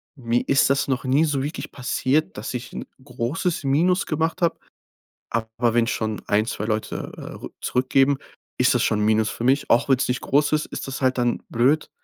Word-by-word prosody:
Mir 120 -3 0
ist 140 -1 +4
das 140 0 +1
noch 130 -1 -1
nie 135 +4 +3
so 140 -3 -1
wirklich 150 +3 -5
passiert, 135 +3 0
dass 110 - -5
ich 125 0 -6
'n - - -5 0.2
großes 140 +7 -2
Minus 175 +7 +2
gemacht 160 +2 -1
habe, 170 -1 +2 0.7
aber 115 +1 -1
wenn 120 -1 +4
ich 115 - -1
schon 110 -1 -3
1, 105 +2 +2
2 105 - -3
Leute, 110 0 -3
äh, - - -10
rück - - -9
zurückgeben, 135 +2 +2 0.4
ist 125 0 +4
das 120 - +2
schon 105 -1 +1
'n - - +1
Minus 110 0 +3
für 120 - -5
mich. 135 +3 +2
Auch 120 - +4
wenn's 130 -1 +3
nicht 125 - -1
groß 145 +2 +2
ist, 155 0 +1
ist - - -6
das 135 +1 -5
halt 130 0 +2
dann 120 -1 0
blöd. 135 +7 +2
130 Hz, 210 wpm, -23 LUFS, 115-145 Hz, 0.7 s, ist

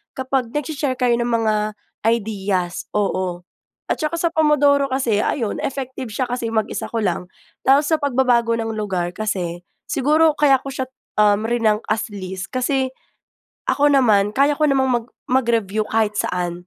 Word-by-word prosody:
kapag 260 -2 -1
nagshe-share 290 -2 -2
kayo 245 -1 +3
ng 240 0 -1
mga 225 -2 +2 0.6
ideas. 195 -5 -2
Oo. 185 -3 -1 0.4
At - - -1
saka 315 +2 -1
sa 340 - +2
Pomodoro 290 -3 +3
kasi, 240 -6 +1
ayon, 230 -8 -1
effective 260 -3 -4
siya 255 +4 -1
kasi 240 -2 -3
mag-isa 220 -2 -1
ko 230 - -1
lang. 180 -2 -2 0.3
Tapos 280 +2 +4
sa - - +6
pagbabago 245 -4 +2
ng 225 0 -2
lugar 185 -4 -2
kasi, 180 -5 -3 0.2
siguro 305 +3 +3
kaya 275 -3 +4
ko 275 - -10
siya, 260 -1 -2 0.3
um, 210 0 +3
rinank 225 -2 +1
as 220 +1 +1
least. 190 -1 -6
Kasi 260 +1 0 0.8
ako 290 +1 +3
naman 215 -7 +4
kaya 280 +3 +3
ko 305 - +3
namang 265 -1 +2
mag 225 - -19 0.2
mag-review 230 -5 +1
kahit 220 -2 +1
saan. 175 0 -2
235 Hz, 155 wpm, -21 LUFS, 205-270 Hz, 0.8 s, sa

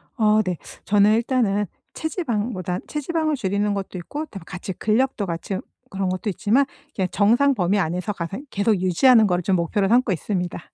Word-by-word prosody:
어 215 -2 +4
네. 185 -5 -2 0.3
저는 205 +1 +4
일단은 225 -4 +1 0.3
체지방보다 230 - -2
체지방을 310 +1 -1
줄이는 205 -3 0
것도 195 -2 -4
있고 290 - -5
그다음에 195 - -10
같이 185 +1 -6
근력도 220 +1 0
같이 175 +2 -4
으 - - -3 0.3
그런 195 -1 -2
것도 185 +3 -2
있지만 215 +8 +2 0.3
이렇게 190 -2 0
정상 235 +8 +4
범위 200 -3 +1
안에서 180 +3 -1
가생 195 - -5
계속 205 0 +1
유지하는 220 +6 +5
거를 180 -1 +1
좀 190 0 +2
목표로 195 +4 +1
삼고 240 -1 +3
있습니다. 180 0 -2
205 Hz, 400 characters per minute, -23 LUFS, 185-240 Hz, 0.3 s, 유지하는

